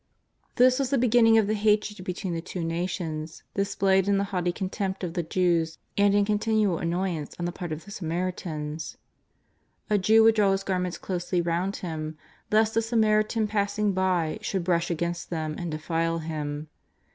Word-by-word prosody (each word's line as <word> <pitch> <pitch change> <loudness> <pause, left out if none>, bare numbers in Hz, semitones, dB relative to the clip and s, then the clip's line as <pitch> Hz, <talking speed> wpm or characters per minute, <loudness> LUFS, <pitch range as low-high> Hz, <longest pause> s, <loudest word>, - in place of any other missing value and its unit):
This 255 +2 +5
was 270 -2 0
the 275 - +2
beginning 230 -2 +5
of 220 - +4
the 210 - 0
hatred 210 -2 +1
between 180 0 -3
the 165 - -2
two 175 0 -5
nations, 165 -2 -3
dis 195 0 -1
played 190 0 +3
in 200 -1 +3
the 200 - +1
haughty 180 -1 +1
contempt 190 +1 -3
of 170 -2 -3
the 175 - 0
Jews 170 -1 +1 0.2
and 200 0 +4
in 205 0 +4
con 210 0 +1
tinual 215 -6 +1
annoyance 170 -3 -2
on 175 - -3
the 175 - -1
part 175 -1 -6
of 155 +3 -5
the 200 - -11
Samaritans. 165 -4 -4 0.9
A 210 - +4
Jew 220 +4 +5
would 225 0 +7
draw 205 -3 +3
his 195 0 -1
garments 180 -2 -1
closely 180 -1 -2
round 175 +3 0
him 155 -3 -5 0.3
lest 220 +1 +3
a 225 - +4
Samaritan 220 -1 +2
passing 205 0 0
by 180 -4 0
should 190 -3 -2
brush 170 -1 +1
against 170 0 -2
them 155 -2 -2
and 175 - -3
defile 165 +2 -1
him. 155 -2 -4
185 Hz, 180 wpm, -26 LUFS, 165-210 Hz, 0.9 s, would